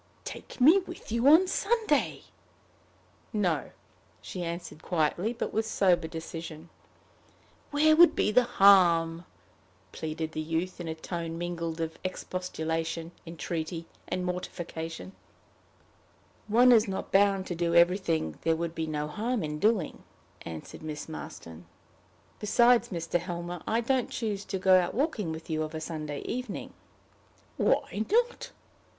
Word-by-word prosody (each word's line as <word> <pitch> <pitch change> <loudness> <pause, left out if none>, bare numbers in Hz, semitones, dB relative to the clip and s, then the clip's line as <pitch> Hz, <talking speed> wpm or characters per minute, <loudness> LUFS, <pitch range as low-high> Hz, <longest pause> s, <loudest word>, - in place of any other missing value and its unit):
"Take - - -9
me 315 +10 +7
with 355 - -10
you 235 +3 +2
on 320 +6 +8
Sunday?" 410 -7 0 1.1
"No," 185 -8 0 0.5
she 180 - -7
answered 170 -2 -6
quietly, 175 +6 0
but 240 - -4
with 220 +1 0
sober 180 -6 +2
decision. 165 0 -7 1.0
"Where 310 +2 +4
would 345 +2 +7
be - - +2
the 250 +2 +4
harm?" 170 -4 +5 0.7
pleaded 160 0 -4
the 155 - -3
youth, 165 +4 -3
in 170 - -6
a 160 - -3
tone 165 0 -5
mingled 170 -1 -4
of 160 0 -4
expostulation, 165 -3 -3 0.2
entreaty, 165 0 -4 0.2
and 180 - -2
mortification. 175 -1 -5 1.4
"One 240 +4 +6
is 225 -2 +6
not 190 -1 -4
bound 195 -1 +3
to 180 - -4
do 170 0 0
everything 170 - +2
there 165 0 +2
would 165 0 -3
be 160 -1 -3
no 150 -1 -2
harm 220 +7 -2
in 150 0 -4
doing," 210 -5 +1 0.4
answered 80 -2 -8
Miss 155 -1 -6
Marston. 85 - -9 0.7
"Besides, 240 +3 +4
Mr. 170 -1 -1
Helmer, 175 -1 -5
I 225 +2 +1
don't 255 +1 0
choose 210 -4 -3
to 195 - -3
go 185 0 +5
out 180 - -2
walking 235 - -1
with 160 0 -7
you 155 -1 -1
of 155 0 -4
a - - -3
Sunday 155 -3 -5
evening." 250 -4 -5 0.8
"Why 210 - +1
not?" 475 +2 +1
175 Hz, 135 wpm, -29 LUFS, 160-215 Hz, 1.4 s, on